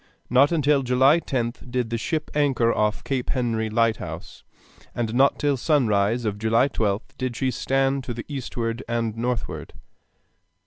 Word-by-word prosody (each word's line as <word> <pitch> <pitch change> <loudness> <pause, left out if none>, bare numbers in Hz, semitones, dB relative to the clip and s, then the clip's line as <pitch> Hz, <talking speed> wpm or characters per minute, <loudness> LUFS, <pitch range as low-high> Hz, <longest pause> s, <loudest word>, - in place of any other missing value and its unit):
Not 135 +4 +5
until 150 -3 +3
July 130 +5 +4
10th 125 -4 -3
did 120 -2 -2
the 115 - 0
ship 155 +5 -3
anchor 135 -6 +2
off 105 -1 0
Cape 130 -3 -2
Henry 115 -4 0
lighthouse, 110 0 -2 0.5
and 115 -2 -2
not 135 +3 +4
till 145 -2 +1
sunrise 115 -5 +1
of 105 -1 -2
July 115 +5 +3
12th 110 +2 -2
did 130 -2 -2
she 130 +2 0
stand 135 +1 0
to 120 - -4
the 115 - -6
eastward 120 -4 -4
and 115 -2 -1
northward. 120 0 -3
125 Hz, 150 wpm, -24 LUFS, 115-135 Hz, 0.5 s, Not